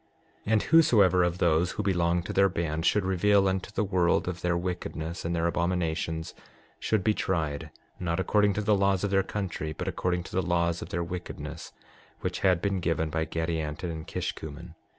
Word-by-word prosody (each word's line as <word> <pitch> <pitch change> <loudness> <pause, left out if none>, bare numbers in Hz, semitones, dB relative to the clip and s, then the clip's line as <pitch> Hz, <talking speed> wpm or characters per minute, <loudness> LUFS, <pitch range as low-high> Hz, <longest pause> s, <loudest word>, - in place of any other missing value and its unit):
6:24 - - 0
And 110 - +3
whosoever 105 - +5
of 85 0 0
those 85 0 +2
who 105 - -3
belonged 90 -2 +1
to - - -4
their 100 0 +4
band 80 -2 -1
should 105 -3 +2
reveal 95 +1 +3
unto 95 0 -1
the 105 +1 -1
world 90 -4 +2
of 90 -1 -4
their 90 -1 +1
wickedness 85 -1 -4
and 85 +1 -1
their 85 0 0
abominations, 85 -2 -1 0.5
should 110 -4 0
be 110 - +3
tried, 80 -6 -2 0.3
not 85 -1 -1
according 105 +2 +3
to 105 - -1
the 105 0 +2
laws 100 -1 +2
of 100 - 0
their 95 0 +4
country, 95 -6 -4
but - - -5
according 90 -1 -1
to - - -11
the 95 - +1
laws 85 -1 0
of - - -7
their 85 +1 -2
wickedness, 80 -3 -7 0.5
which - - -2
had 90 -3 +2
been 100 -2 0
given 80 -2 -1
by 80 0 0
Gadianton 80 +1 -2
and 80 -1 -7
Kishkumen. 80 +2 -5
90 Hz, 190 wpm, -28 LUFS, 80-95 Hz, 0.5 s, whosoever